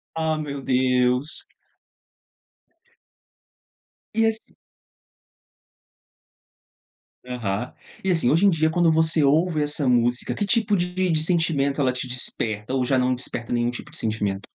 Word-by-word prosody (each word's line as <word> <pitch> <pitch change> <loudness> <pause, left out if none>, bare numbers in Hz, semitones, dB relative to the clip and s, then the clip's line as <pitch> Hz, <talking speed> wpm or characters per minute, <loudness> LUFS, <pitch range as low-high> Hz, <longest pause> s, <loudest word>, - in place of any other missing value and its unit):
Ah, 160 -1 0
meu 140 -2 -5
Deus. 125 +2 +2 2.7
E 225 0 +2
esse 220 0 -3 2.7
Aham. 120 -2 -4 0.3
E 190 - +1
assim, 165 -8 +2
hoje 170 +7 +4
em - - +6
dia, 160 -2 +1
quando 170 0 +2
você 160 0 +2
ouve 155 +2 +2
essa 145 -2 -1
música, 120 0 +1
que 205 - -2
tipo 210 0 +2
de 180 -1 -1
sentimento 155 -4 0
ela 130 -2 +2
te 125 0 -4
desperta 115 -2 -1
ou 130 -1 +1
já 130 +1 +1
não 125 0 +1
desperta 120 -1 -5
nenhum 120 0 +1
tipo 150 +5 -9
de - - -9
sentimento? 105 -3 -2
140 Hz, 130 wpm, -23 LUFS, 125-165 Hz, 2.7 s, em